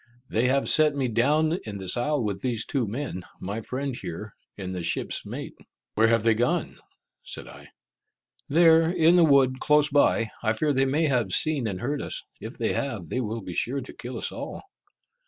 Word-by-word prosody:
They 115 +3 +2
have 135 +2 +1
set 155 -2 +4
me 135 -2 0
down 150 - +2
in 105 -2 -6
this 95 -2 -2
isle 140 +2 0
with 100 -2 -3
these 120 -4 -1
two 130 -6 -1
men, 115 -3 -4 0.2
my 100 +4 -4
friend 130 +3 -4
here, 100 +1 -7 0.2
and 95 -2 -5
the 90 - -4
ship's 85 - -1
mate." - - -6 0.4
"Where 110 +1 +4
have 115 -1 +3
they 115 0 +4
gone?" 120 +3 -1 0.4
said - - -6
I. - - -13 0.8
"There, 165 +1 +5
in 170 -1 +4
the 175 - +6
wood, 135 -4 +4
close 150 0 +3
by. 140 -6 +3
I 110 -1 +1
fear 145 +6 0
they 135 0 +2
may 150 +5 +1
have 125 -6 +1
seen 150 -7 +1
and 95 -3 -4
heard 145 +3 -2
us. - - -4 0.2
If - - -8
they - - 0
have, 110 - -3
they 125 - -1
will 115 0 -3
be 90 - -7
sure 135 +9 -1
to - - -10
kill 125 +1 -7
us - - -2
all." - - -7
130 Hz, 200 wpm, -26 LUFS, 110-145 Hz, 0.8 s, the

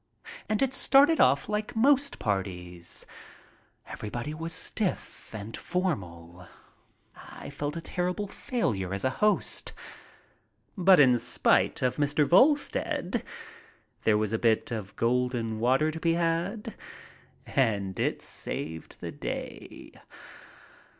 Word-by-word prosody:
And 215 +3 +2
it 265 -1 0
started 280 +4 +5
off 140 - +4
Hke 210 +2 -3
most 280 +4 +3
parties; 90 -4 -3 0.8
every 105 - -7
body 120 +7 -4
was 165 +2 -5
stiff 180 +4 -3
and 110 +1 -6
formal; 90 - -4 0.7
I - - -10
felt 145 +2 -4
a - - -4
terrible 180 +4 -2
failure 110 - -2
as 100 - -5
a 130 - +2
host. 210 0 +1 1.0
But 190 -2 +6
in 125 -4 +6
spite - - +2
of 125 - +1
Mr. 145 0 +2
Volstead 280 - +2 0.8
there 105 -1 +4
was 110 0 -1
a 110 - 0
bit 115 0 +2
of 105 -4 -5
"golden 120 -2 0
water" 130 +7 +2
to 160 - -6
be 165 0 +2
had, 170 +6 -1 0.7
and 100 - 0
it - - -1
saved 80 0 -6
the - - -5
day. - - -7
140 Hz, 120 wpm, -28 LUFS, -, 1.0 s, But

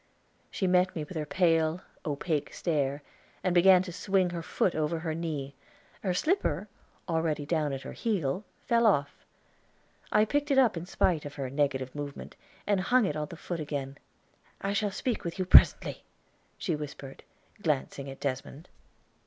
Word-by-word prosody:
She 190 - -2
met 180 0 +3
me 160 - -2
with 160 +5 -10
her 155 -2 -3
pale, 165 +1 +2 0.3
opaque 150 +1 -1
stare, 145 -4 -1 0.4
and 185 - +1
began 180 +1 +6
to 185 - -7
swing 190 0 +1
her 170 -1 -4
foot 170 +2 0
over 155 +1 0
her 160 -1 -3
knee; 155 -4 -4 0.5
her 185 -3 -1
slipper, 210 - 0 0.4
already 160 -3 0
down 155 -2 0
at 135 0 -5
her - - -7
heel, 190 -6 -1 0.2
fell 235 -1 +4
off. 145 -8 +1 0.9
I 210 - +5
picked 290 +6 0
it 275 - +3
up 250 -7 +5
in 170 +1 -5
spite 175 -4 +1
of 145 -1 -8
her 135 -3 -4
negative 135 -2 0
movement 145 -1 -7 0.3
and 205 -2 +2
hung 245 +4 +3
it - - -1
on 150 -1 -2
the 165 - -10
foot 175 0 -5
again. 140 -3 -4 0.6
"I 195 0 -2
shall 205 0 +1
speak 235 +4 -2
with 170 +1 -4
you 185 - -1
presently," 185 - +6 0.5
she 170 - -1
whispered, 140 -2 -8 0.4
glancing 140 -3 -1
at 135 - -9
Desmond. 140 +4 -4
165 Hz, 170 wpm, -29 LUFS, 145-185 Hz, 0.9 s, began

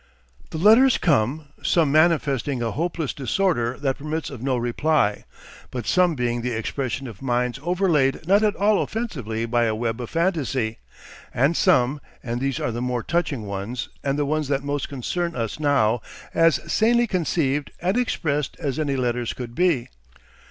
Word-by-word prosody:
The - - -5
letters 225 +9 +6
come, 145 0 +1
some 160 -5 +2
manifesting 145 -5 +2
a 115 - -1
hopeless 165 -2 -2
disorder 130 - 0
that 135 -2 -1
permits 155 +2 -4
of 130 -5 -8
no 130 -1 0
reply, 120 -2 +1 0.4
but 125 -3 -5
some 180 -3 +3
being 120 -2 -1
the 125 0 -2
expression 130 +3 -3
of 115 -7 -9
minds 125 0 -1
overlaid 165 -4 +1
not 200 +3 +5
at 210 -1 +2
all 205 0 +3
offensively 125 - -3
by 120 0 +1
a 110 -1 0
web 115 +1 -2
of 120 - -6
fantasy, 145 -10 -1 0.5
and 140 +7 +2
some 145 -6 +3 0.2
(and 120 0 -3
these 135 -2 -1
are 120 - -1
the 120 +1 -4
more 125 -2 -1
touching 155 -9 -1
ones 100 +5 -4
and 140 0 0
the 145 - +1
ones 155 0 -1
that 140 0 0
most 145 -1 -2
concern 170 +6 -3
us 115 +3 -3
now) 130 -7 +2 0.3
as 165 -2 +4
sanely 235 +2 +3
conceived 155 - 0
and 185 +4 0
expressed 150 - -1
as 140 0 -2
any 145 -3 0
letters 120 -2 -1
could 120 -2 -7
be. 170 -6 +1
140 Hz, 165 wpm, -23 LUFS, 120-165 Hz, 0.5 s, letters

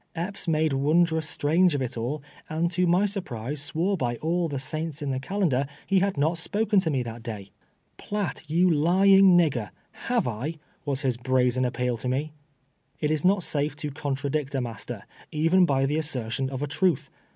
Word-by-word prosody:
Epps 180 +3 -3
made 155 -2 +2
wondrous 160 +3 +2
strange 165 +3 +2
of 140 - -1
it 125 - -4
all, 130 +6 -3 0.3
and 165 +2 0
to 180 0 +1
my 180 +4 +4
surprise, 145 - -3
swore 165 +7 0
by 120 -8 -1
all 170 +6 0
the 145 -3 -4
saints 155 +3 -4
in 140 - -1
the 130 - -1
calendar 140 -4 0 0.2
he 195 -1 +3
had 195 -2 0
not 160 +4 +1
spoken 210 +4 +2
to 175 - 0
me 135 -4 0
that 115 0 -7
day. 105 -4 -7 0.2
" - - -44
Piatt, 205 -6 -4
you 175 +4 +3
lying 185 +4 +5
nigger, 135 - +1 0.4
have 240 - +1
I 125 +8 -3
?" - - -37
was 140 0 -1
his 130 -3 0
brazen 125 0 +1
aj^peal 125 -1 -1
to 125 - -4
me. 145 +4 -2 0.7
It 150 -1 0
is 155 -2 0
not 185 0 +3
safe 145 -1 -1
to 150 -1 -5
contradict 140 0 -2
a 135 - +1
master, 115 -2 -6 0.3
even 165 +4 +3
by 135 -2 +2
the 145 +3 0
assertion 130 -4 -1
of 135 +1 -4
a - - -1
truth. 170 0 0
150 Hz, 195 wpm, -26 LUFS, 130-175 Hz, 0.7 s, lying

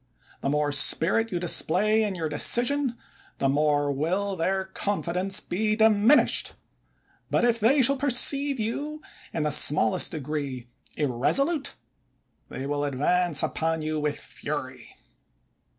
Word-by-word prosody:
The - - -2
more 150 0 0
spirit 190 +9 +2
you 175 - -2
display 195 +5 +1
in 205 -3 -2
your 165 -3 -3
decision, 240 - +2 0.4
the 135 - 0
more 145 0 +1
will 185 +8 -2
their 190 +3 -1
confidence 190 -1 -1
be 215 +4 -2
diminished; 220 +4 +3 0.8
but - - +1
if 235 -1 +1
they 260 +6 +3
shall 275 +3 +5
perceive 275 +1 +1
you 295 +8 -4 0.3
in 160 - -3
the 150 - -1
smallest 140 -6 +3
degree 140 -4 -5 0.3
irresolute, 270 - 0 0.7
they 130 - -7
will 145 +1 -2
advance 150 +4 0
upon 160 -1 -2
you 155 0 -2
with 150 -1 -2
fury. - - -7
180 Hz, 125 wpm, -25 LUFS, 150-225 Hz, 0.8 s, shall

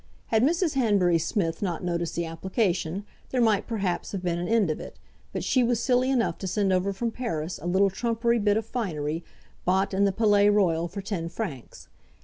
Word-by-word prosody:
Had 220 -1 +3
Mrs. 330 +4 +2
Hanbury 200 -10 +3
Smith 165 -2 -1
not 180 -4 -2
noticed 170 -2 -2
the 170 - -1
application, 185 +1 -1 0.2
there 255 - -1
might, 220 -4 +3
perhaps, 200 -6 -2
have 190 -2 -4
been 170 -1 0
an 175 - -3
end 220 -7 +3
of - - -4
it, - - -9 0.3
but - - -3
she 255 - +3
was 240 -1 +1
silly 250 +1 +2
enough 255 -4 +1
to 190 - -4
send 195 0 +1
over 185 +2 +1
from 230 +4 -2
Paris 180 -10 -3
a 170 - -6
little 190 +2 +3
trumpery 235 +3 0
bit 205 0 +2
of 220 - -2
finery, 165 -9 -3 0.4
bought 190 +2 +1
in 195 +1 +2
the 200 - +3
Palais 205 0 +4
Royal 175 -5 +2
for 195 +3 -7
ten 180 -5 -3
francs. 165 - -6
195 Hz, 200 wpm, -26 LUFS, 175-225 Hz, 0.4 s, Palais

